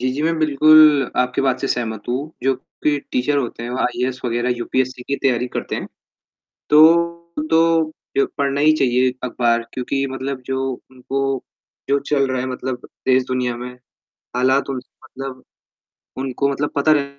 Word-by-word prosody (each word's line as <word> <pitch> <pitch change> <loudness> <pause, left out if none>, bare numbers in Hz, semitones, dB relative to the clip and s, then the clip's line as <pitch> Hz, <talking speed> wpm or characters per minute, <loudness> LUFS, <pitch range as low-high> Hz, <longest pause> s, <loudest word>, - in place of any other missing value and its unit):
जी, 130 +1 0
जी, 145 - -3
मैं 165 0 +1
बिल्कुल 155 -2 +6
आपकी 125 +1 +1
बात 130 -1 +1
से 135 - -1
सहमत 110 -3 -2
हूँ। 125 - +1 0.3
जो 135 0 +2 0.3
कि 145 -1 +2
टीचर 135 +3 +1
होते 120 -2 -4
हैं, 120 - -5
वो 125 - -3
आईएएस 125 +1 -1
वगैरह 120 +1 0
यूपीएससी 130 +1 -2
की 140 +2 -2
तैयारी 125 -2 +2
करते - - -3
हैं, - - -5 0.8
तो 170 +1 +4
तो, 165 -1 +3 0.3
यो 140 - +4
पढ़ना 140 0 0
ही 155 +1 +6
चाहिए 130 -3 +2
अखबार 120 -1 +1
क्योंकि 135 +2 -1
मतलब 135 0 -4
जो 130 0 -2 0.3
उनको 135 +1 -2 0.5
जो 140 0 +3
चल 140 -1 +1
रहा 130 -1 -1
है 130 - -3
मतलब 130 -1 -5 0.2
देश-दुनिया 130 -1 +1
में, 125 +1 -6 0.7
हालात 130 +2 +2
उनसे 130 0 -6
मतलब 130 -1 -8 0.8
उनको 135 +1 -1
मतलब 145 +1 -2
पता 150 +2 +4
रहे 145 -2 +3
130 Hz, 165 wpm, -20 LUFS, 125-145 Hz, 0.8 s, बिल्कुल